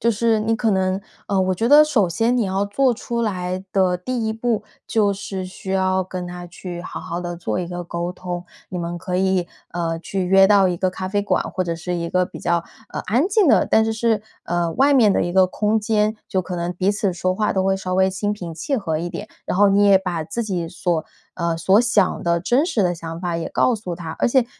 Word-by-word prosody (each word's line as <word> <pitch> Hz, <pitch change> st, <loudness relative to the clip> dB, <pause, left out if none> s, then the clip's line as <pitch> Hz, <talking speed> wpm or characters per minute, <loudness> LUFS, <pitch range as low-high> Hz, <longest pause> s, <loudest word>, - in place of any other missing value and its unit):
就 235 Hz, 0 st, +3 dB
是 225 Hz, +1 st, +2 dB
你 220 Hz, +1 st, +1 dB
可 225 Hz, 0 st, +1 dB
能， 190 Hz, -1 st, +1 dB, 0.3 s
呃， 195 Hz, -2 st, +1 dB
我 185 Hz, 0 st, +1 dB
觉 225 Hz, +6 st, 0 dB
得 295 Hz, +3 st, +9 dB
首 255 Hz, -11 st, +2 dB
先 225 Hz, +9 st, +1 dB
你 235 Hz, -, +2 dB
要 195 Hz, +1 st, 0 dB
做 245 Hz, +5 st, +2 dB
出 235 Hz, +1 st, -3 dB
来 185 Hz, -4 st, -2 dB
的 185 Hz, -2 st, +2 dB
第 230 Hz, +4 st, -2 dB
1 -, -, 0 dB
步， 225 Hz, -1 st, -1 dB, 0.2 s
就 210 Hz, -3 st, +2 dB
是 195 Hz, -1 st, -5 dB
需 190 Hz, +1 st, -7 dB
要 190 Hz, 0 st, +1 dB
跟 180 Hz, -1 st, -5 dB
他 175 Hz, 0 st, -7 dB
去 175 Hz, 0 st, -7 dB
好 180 Hz, -, -7 dB
好 170 Hz, +1 st, -4 dB
地 175 Hz, -1 st, -5 dB
做 175 Hz, -, -3 dB
一 180 Hz, -, -2 dB
个 175 Hz, 0 st, -5 dB
沟 170 Hz, +1 st, -4 dB
通。 180 Hz, -1 st, -6 dB, 0.2 s
你 180 Hz, -, -5 dB
们 170 Hz, 0 st, -3 dB
可 180 Hz, 0 st, -3 dB
以， 190 Hz, -1 st, +1 dB, 0.2 s
呃， 165 Hz, -1 st, -2 dB
去 190 Hz, +2 st, -3 dB
约 195 Hz, +1 st, +6 dB
到 200 Hz, -2 st, +5 dB
一 180 Hz, -, -1 dB
个 185 Hz, +2 st, +1 dB
咖 185 Hz, 0 st, -5 dB
啡 205 Hz, +1 st, 0 dB
馆， 205 Hz, -, +1 dB
或 185 Hz, -, -2 dB
者 170 Hz, -1 st, -2 dB
是 175 Hz, +1 st, -4 dB
一 170 Hz, 0 st, -3 dB
个 180 Hz, +1 st, +2 dB
比 -, -, -10 dB
较， 170 Hz, -1 st, 0 dB, 0.3 s
呃， -, -, -4 dB
安 240 Hz, -, +2 dB
静 400 Hz, -5 st, +3 dB
的， 225 Hz, -, +4 dB
但 220 Hz, -, +4 dB
是 225 Hz, -, 0 dB
是， 220 Hz, -1 st, +1 dB, 0.2 s
呃， 175 Hz, -1 st, 0 dB
外 280 Hz, +2 st, +4 dB
面 220 Hz, -7 st, +5 dB
的 -, -, +1 dB
一 175 Hz, -, -3 dB
个 185 Hz, 0 st, +5 dB
空 215 Hz, +3 st, 0 dB
间， 215 Hz, 0 st, +1 dB
就 190 Hz, -, +1 dB
可 185 Hz, 0 st, -6 dB
能 175 Hz, 0 st, -2 dB
彼 185 Hz, +3 st, +1 dB
此 200 Hz, -2 st, 0 dB
说 185 Hz, +1 st, -1 dB
话 210 Hz, +2 st, 0 dB
都 190 Hz, -1 st, 0 dB
会 195 Hz, 0 st, +2 dB
稍 185 Hz, -1 st, -3 dB
微 190 Hz, 0 st, +4 dB
心 200 Hz, +2 st, -2 dB
平 175 Hz, -5 st, -6 dB
气 270 Hz, -, -2 dB
和 165 Hz, -9 st, -2 dB
一 175 Hz, +1 st, -4 dB
点。 205 Hz, -, -6 dB, 0.2 s
然 -, -, -1 dB
后 205 Hz, 0 st, +6 dB
你 200 Hz, +1 st, +4 dB
也 195 Hz, -1 st, +6 dB
把 175 Hz, -4 st, -3 dB
自 215 Hz, +8 st, -4 dB
己 180 Hz, -5 st, -2 dB
所 170 Hz, -2 st, -1 dB, 0.3 s
呃， 170 Hz, -2 st, -1 dB
所 190 Hz, +5 st, +4 dB
想 225 Hz, -6 st, +2 dB
的 170 Hz, 0 st, +2 dB
真 245 Hz, -, +2 dB
实 225 Hz, -, +1 dB
的 175 Hz, -, +1 dB
想 165 Hz, 0 st, -7 dB
法 175 Hz, -2 st, -2 dB
也 165 Hz, -, -3 dB
告 250 Hz, -, +2 dB
诉 185 Hz, -6 st, -5 dB
他。 160 Hz, -2 st, -6 dB
而 -, -, +3 dB
且 245 Hz, -1 st, +3 dB
190 Hz, 265 characters per minute, -21 LUFS, 175-215 Hz, 0.3 s, 得